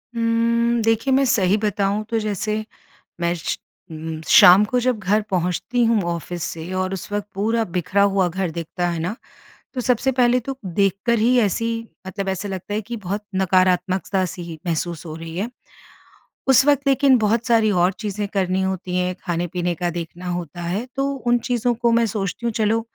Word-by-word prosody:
उम्म, 230 Hz, 0 st, +1 dB
देखिए, 225 Hz, +4 st, +2 dB
मैं 275 Hz, +1 st, +4 dB
सही 200 Hz, -3 st, +3 dB
बताऊँ 205 Hz, 0 st, 0 dB
तो 225 Hz, -1 st, 0 dB
जैसे 215 Hz, +1 st, -2 dB, 0.6 s
मैं 170 Hz, 0 st, +1 dB
श 165 Hz, -, -3 dB, 0.3 s
उम, 160 Hz, 0 st, -6 dB
शाम 185 Hz, +4 st, +8 dB
को 250 Hz, +3 st, 0 dB
जब 250 Hz, -2 st, +1 dB
घर 210 Hz, +3 st, +1 dB
पहुँचती 185 Hz, +7 st, 0 dB
हूँ 225 Hz, -3 st, +3 dB
ऑफ़िस 170 Hz, 0 st, -5 dB
से, 165 Hz, +2 st, -5 dB
और 185 Hz, 0 st, -1 dB
उस 195 Hz, -, -6 dB
वक़्त 205 Hz, -1 st, -2 dB
पूरा 225 Hz, +3 st, +1 dB
बिखरा 180 Hz, +3 st, 0 dB
हुआ 195 Hz, -2 st, +2 dB
घर 180 Hz, 0 st, -2 dB
दिखता 170 Hz, +2 st, -3 dB
है 170 Hz, -1 st, -3 dB
ना, 180 Hz, +7 st, -2 dB, 0.6 s
तो 255 Hz, -, -2 dB
सबसे 250 Hz, +2 st, +1 dB
पहले 250 Hz, 0 st, +3 dB
तो 270 Hz, -1 st, -3 dB
देखकर 200 Hz, +5 st, +1 dB
ही 245 Hz, +3 st, +3 dB
ऐसी 220 Hz, +2 st, 0 dB, 0.4 s
मतलब, 195 Hz, 0 st, -4 dB
ऐसे 190 Hz, +2 st, -2 dB
लगता 195 Hz, +2 st, -5 dB
है 215 Hz, -, 0 dB
कि 235 Hz, +3 st, -6 dB
बहुत 205 Hz, +1 st, -4 dB
नकारात्मकता 185 Hz, 0 st, +2 dB
सी 175 Hz, 0 st, -7 dB
ही 165 Hz, -2 st, -8 dB
महसूस 170 Hz, 0 st, -2 dB
हो 155 Hz, -, -6 dB
रही 165 Hz, 0 st, -8 dB
है। 210 Hz, +5 st, -2 dB, 1.0 s
उस 265 Hz, 0 st, +6 dB
वक़्त 285 Hz, -1 st, +4 dB
लेकिन 270 Hz, -2 st, +4 dB
बहुत 225 Hz, +3 st, +1 dB
सारी 225 Hz, -3 st, +4 dB
और 180 Hz, 0 st, +3 dB
चीज़ें 205 Hz, -1 st, -3 dB
करनी 190 Hz, -1 st, +1 dB
होती 185 Hz, -1 st, -2 dB
हैं, 180 Hz, 0 st, 0 dB
खाने-पीने 175 Hz, 0 st, -2 dB
का 175 Hz, +1 st, -2 dB
देखना 175 Hz, +1 st, -7 dB
होता 175 Hz, -1 st, -5 dB
है, 185 Hz, +7 st, -2 dB
तो 275 Hz, +1 st, 0 dB, 0.2 s
उन 240 Hz, 0 st, +4 dB
चीज़ों 240 Hz, 0 st, 0 dB
को 235 Hz, 0 st, +1 dB
मैं 230 Hz, 0 st, +3 dB
सोचती 205 Hz, +2 st, -3 dB
हूँ, 230 Hz, -, 0 dB
चलो, 220 Hz, +1 st, +1 dB
200 Hz, 185 wpm, -21 LUFS, 180-230 Hz, 1.0 s, शाम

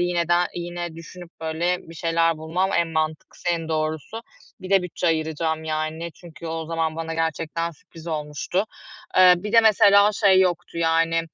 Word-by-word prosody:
yine 175 Hz, -1 st, 0 dB
de 175 Hz, -, +4 dB, 0.2 s
yine 175 Hz, -1 st, -5 dB
düşünüp 170 Hz, +1 st, -11 dB
böyle 165 Hz, +3 st, -1 dB
bir 165 Hz, -, -13 dB
şeyler 165 Hz, 0 st, +1 dB
bulmam 175 Hz, +5 st, -1 dB
en 170 Hz, -, +1 dB
mantıklısı, 155 Hz, +1 st, -3 dB
en 165 Hz, -2 st, -1 dB
doğrusu. 160 Hz, +7 st, -3 dB, 0.4 s
Bir 185 Hz, -, -8 dB
de 195 Hz, -2 st, +4 dB
bütçe 180 Hz, 0 st, -3 dB
ayıracağım, 160 Hz, 0 st, -1 dB
yani. 155 Hz, +2 st, -3 dB
Çünkü 170 Hz, -1 st, -11 dB
o 160 Hz, 0 st, -4 dB
zaman 160 Hz, -1 st, -2 dB
bana 165 Hz, 0 st, -4 dB
gerçekten 165 Hz, +1 st, -2 dB
sürpriz 165 Hz, +1 st, -15 dB
olmuştu. 155 Hz, +4 st, -2 dB, 0.5 s
Eee, 185 Hz, -1 st, +8 dB
bir 205 Hz, +4 st, -6 dB
de 230 Hz, -, +8 dB
mesela 205 Hz, -1 st, +5 dB
şey 195 Hz, -3 st, +4 dB
yoktu, 175 Hz, -2 st, -1 dB
yani, 165 Hz, 0 st, +2 dB
165 Hz, 165 wpm, -23 LUFS, 160-175 Hz, 0.5 s, Eee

